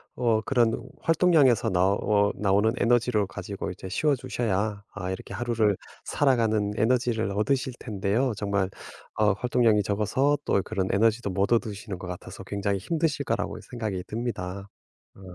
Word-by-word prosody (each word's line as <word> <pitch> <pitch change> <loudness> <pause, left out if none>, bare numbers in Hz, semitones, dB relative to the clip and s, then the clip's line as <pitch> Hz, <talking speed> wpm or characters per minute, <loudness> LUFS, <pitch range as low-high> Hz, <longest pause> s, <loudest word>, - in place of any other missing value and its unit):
어 115 -3 +2
그런 120 -2 +2 0.3
활동량에서 155 - +4
나오 100 +2 +2
나오는 105 +2 +2
에너지를 120 -4 +2
가지고 95 +2 -6
이제 95 0 -8
쉬어주셔야 110 -6 -1
아 95 -3 -4
이렇게 95 - -7
하루를 115 -4 +1 0.3
살아가는 110 -7 +2
에너지를 115 -1 +1
얻으실 125 +6 0
텐데요. 110 +4 0
정말 100 -2 0 0.5
아 105 -1 +3
활동량이 115 -3 +3
적어서 110 +9 +1
또 100 - +2
그런 95 -2 -2
에너지도 110 +2 +2
못 100 +3 0
얻으시는 105 -4 -1
것 95 - -7
같아서 90 0 -8
굉장히 100 0 -1
힘드실 150 - -1
거라고 - - -2
생각이 110 -7 -4
듭니다. 100 -4 -4 0.5
어. - - -17
110 Hz, 350 characters per minute, -26 LUFS, 100-120 Hz, 0.5 s, 활동량에서